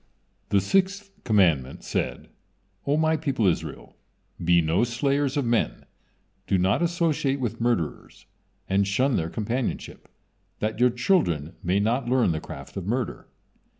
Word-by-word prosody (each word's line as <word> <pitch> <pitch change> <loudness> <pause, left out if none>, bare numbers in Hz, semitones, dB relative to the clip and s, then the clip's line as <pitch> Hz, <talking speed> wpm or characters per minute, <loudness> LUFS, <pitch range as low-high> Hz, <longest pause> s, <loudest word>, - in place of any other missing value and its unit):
The 100 - +3
sixth 195 - +1
commandment 85 - +2
said: - - -3 0.6
"O 145 +2 +2
My 160 0 +3
people 140 -8 -1
Israel, 90 - -2 0.5
be 85 +1 +5
no 85 +6 +2
slayers 135 +4 0
of 140 - +1
men, 115 -1 0 0.6
do 95 - +2
not 95 - +2
associate 165 -5 +1
with 115 -2 -3
murderers, 115 -11 -2 0.4
and 95 +1 +2
shun 125 +6 +2
their 80 0 -1
companionship, 115 +6 -3 0.5
that 110 +1 -2
your 125 0 +5
children 120 - +1
may 90 +3 +1
not 120 +4 0
learn 125 -7 +3
the 80 -1 -2
craft - - -9
of 95 -1 -5
murder." 120 +2 -2
120 Hz, 140 wpm, -25 LUFS, 95-140 Hz, 0.6 s, be